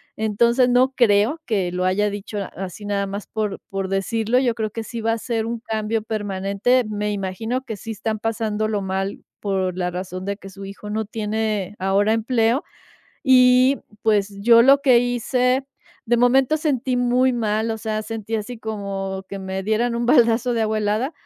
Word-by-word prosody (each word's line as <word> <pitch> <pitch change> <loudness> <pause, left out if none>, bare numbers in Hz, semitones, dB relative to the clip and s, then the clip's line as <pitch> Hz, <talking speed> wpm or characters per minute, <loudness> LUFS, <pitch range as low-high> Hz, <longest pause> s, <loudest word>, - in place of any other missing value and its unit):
Entonces, 235 +4 +2
no 255 +2 +3
creo 235 +6 +3
que 190 -6 0
lo 180 0 -1
haya 205 +3 +2
dicho 205 +1 -5 0.2
así 190 +2 -7
nada 200 -1 -1
más 200 +1 -6
por 215 -3 -3
por 195 -1 -3
decirlo, 225 +5 +1
yo 240 -3 +1
creo 220 -2 -2
que 225 0 -5
sí 230 0 -6
va 225 +1 +1
a - - -1
ser 225 -2 -2
un 230 0 -3
cambio 220 -1 -2
permanente, 205 +3 0
me 210 0 -2
imagino 205 +6 -3
que 220 -5 -6
sí 225 - -7
están 220 0 -3
pasándolo 215 -1 -1
mal, 190 +1 -3 0.2
por 190 -3 -1
la 180 -1 -1
razón 185 +1 -5
de 200 0 -3
que 195 - -11
su 195 +1 -10
hijo 200 +1 -9
no 215 0 -2
tiene, 210 -2 -2
ahora, 200 +3 +2
empleo. 230 +3 +1 0.6
Y, 255 0 +5 0.2
pues, 205 -2 +1
yo 230 +2 +7
lo 275 +2 +6
que 255 -4 +6
hice 250 +2 +1 0.4
de 240 +1 +3
momento 260 +4 +4
sentí 265 -5 0
muy 250 +1 +2
mal, 220 -1 0
o 220 - -3
sea, 215 -1 -3
sentí 225 0 -5
así 220 +2 -6
como 195 -3 -4
que 195 - -6
me 190 0 -4
dieran 225 +3 0
un 235 0 -1
baldazo 240 -1 +4
de 225 - +1
agua 215 0 0
helada, 215 +8 0
220 Hz, 185 wpm, -22 LUFS, 200-240 Hz, 0.6 s, yo